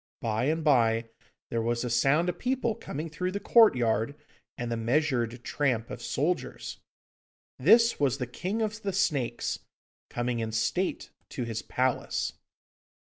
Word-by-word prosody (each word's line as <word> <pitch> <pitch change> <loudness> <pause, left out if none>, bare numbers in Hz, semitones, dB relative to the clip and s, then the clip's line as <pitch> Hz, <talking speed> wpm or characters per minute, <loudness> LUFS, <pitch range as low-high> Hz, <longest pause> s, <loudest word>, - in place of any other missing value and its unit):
By 115 +1 -1
and 160 +3 0
by 115 -6 +3 0.4
there 115 - 0
was 120 +1 0
a 125 - -2
sound 135 +8 +3
of 180 - -2
people 250 -2 0
coming 155 -5 -6
through 180 +4 -3
the 200 - -2
courtyard, 125 - +4 0.4
and 120 -1 -3
the - - 0
measured 120 -1 0
tramp 125 -7 -1
of 120 - -6
soldiers. 155 +9 -2 0.8
This 230 - +5
was 140 -2 +2
the 125 - -2
King 185 - -3
of 215 0 -3
the 195 -2 -2
Snakes 140 -11 0 0.5
coming 120 0 -2
in 110 -1 -3
state 175 +12 -1 0.2
to 125 - -4
his 115 -2 -3
palace. 130 -1 -1
130 Hz, 145 wpm, -28 LUFS, 115-180 Hz, 0.8 s, This